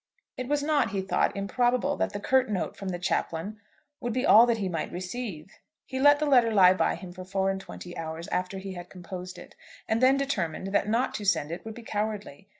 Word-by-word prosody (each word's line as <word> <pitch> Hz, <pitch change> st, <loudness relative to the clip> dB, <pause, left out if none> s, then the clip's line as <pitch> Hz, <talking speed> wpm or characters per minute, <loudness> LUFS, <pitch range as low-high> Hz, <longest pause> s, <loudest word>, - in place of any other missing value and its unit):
It 255 Hz, -, -5 dB
was 290 Hz, +1 st, 0 dB
not, 290 Hz, -6 st, +2 dB
he 200 Hz, -3 st, -2 dB
thought, 190 Hz, -, +1 dB
improbable, 245 Hz, +7 st, +1 dB
that -, -, 0 dB
the 205 Hz, -, -4 dB
curt 255 Hz, +3 st, +2 dB
note 195 Hz, -4 st, -2 dB
from 195 Hz, -, -5 dB
the 180 Hz, -, -2 dB
chaplain 175 Hz, +3 st, -2 dB, 0.4 s
would 240 Hz, -1 st, -3 dB
be 255 Hz, +2 st, 0 dB
all 230 Hz, +3 st, +8 dB
that 235 Hz, -1 st, +2 dB
he 200 Hz, -3 st, -2 dB
might 165 Hz, -3 st, -3 dB
receive. 185 Hz, -2 st, -6 dB, 0.3 s
He 260 Hz, -, -4 dB
let 290 Hz, +1 st, +7 dB
the 305 Hz, -, 0 dB
letter 245 Hz, -5 st, +4 dB
lie 185 Hz, -3 st, +7 dB
by 185 Hz, -, +1 dB
him 180 Hz, -2 st, -9 dB
for 185 Hz, 0 st, -8 dB
four 195 Hz, +1 st, 0 dB
and 195 Hz, 0 st, -4 dB
twenty 175 Hz, -2 st, -9 dB
hours 165 Hz, 0 st, -5 dB
after 180 Hz, +2 st, -2 dB
he 190 Hz, 0 st, -6 dB
had 175 Hz, -1 st, -9 dB
composed 180 Hz, 0 st, -8 dB
it, -, -, -13 dB, 0.3 s
and 220 Hz, +2 st, +1 dB
then 260 Hz, +1 st, +5 dB
determined 195 Hz, -, -2 dB
that 205 Hz, -, +2 dB
not 240 Hz, +4 st, +1 dB
to 210 Hz, -, -4 dB
send 160 Hz, -6 st, +1 dB
it 170 Hz, -, -5 dB
would 220 Hz, -1 st, -7 dB
be 240 Hz, -, -10 dB
cowardly. 205 Hz, -4 st, -4 dB
200 Hz, 230 wpm, -27 LUFS, 180-245 Hz, 0.4 s, all